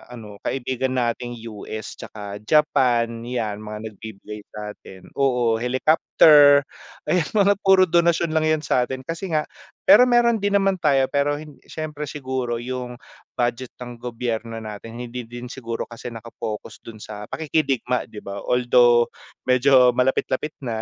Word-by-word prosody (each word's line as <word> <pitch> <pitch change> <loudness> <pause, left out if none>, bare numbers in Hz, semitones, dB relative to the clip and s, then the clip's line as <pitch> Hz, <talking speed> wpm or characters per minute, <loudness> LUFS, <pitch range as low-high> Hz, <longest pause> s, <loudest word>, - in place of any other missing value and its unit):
ano 105 -3 -11
kaibigan 130 0 -2
nating 120 0 -2 0.2
US 110 +1 -7
'tsaka 105 -1 -8
Japan, 120 -6 +2
yan 110 -5 -2
mga 105 +1 -7
nagbibigay 105 0 -9
sa 105 0 -7
atin. 95 -2 -14
Oo, 125 -4 +2
helicopter, 145 +2 +5 0.5
ayan 175 -4 +2
mga 200 -1 +5
puro 190 -2 +5
donasyon 170 -1 +2
lang 160 0 +1
yan 155 -1 +1
sa'tin, 130 0 0
kasi 165 +6 -5
nga 150 -1 +2 0.4
pero 255 -3 +7
meron 235 -2 +3
din 200 0 0
naman 195 -2 +2
tayo 140 -4 +3
pero, 145 +1 +1 0.3
siyempre 150 -2 -5
siguro 130 -4 -3
yung 125 -1 -5 0.4
budget 120 +1 -2
ng 120 -1 -9
gobyerno 115 -1 -4
natin, 110 +2 -8
hindi 120 -1 -6
din 120 +1 -8
siguro 115 -3 -5
kasi 115 0 -10
naka-focus 115 -2 -7
dun 115 - -11
sa 105 -1 -8
pakikidigma 140 -5 -1
'di 110 -2 -11
ba, 100 0 -6
although, 120 +1 +4 0.4
medyo 125 0 +5
malapit-lapit 130 +3 0
na, 115 -3 -3
125 Hz, 140 wpm, -22 LUFS, 115-150 Hz, 0.5 s, pero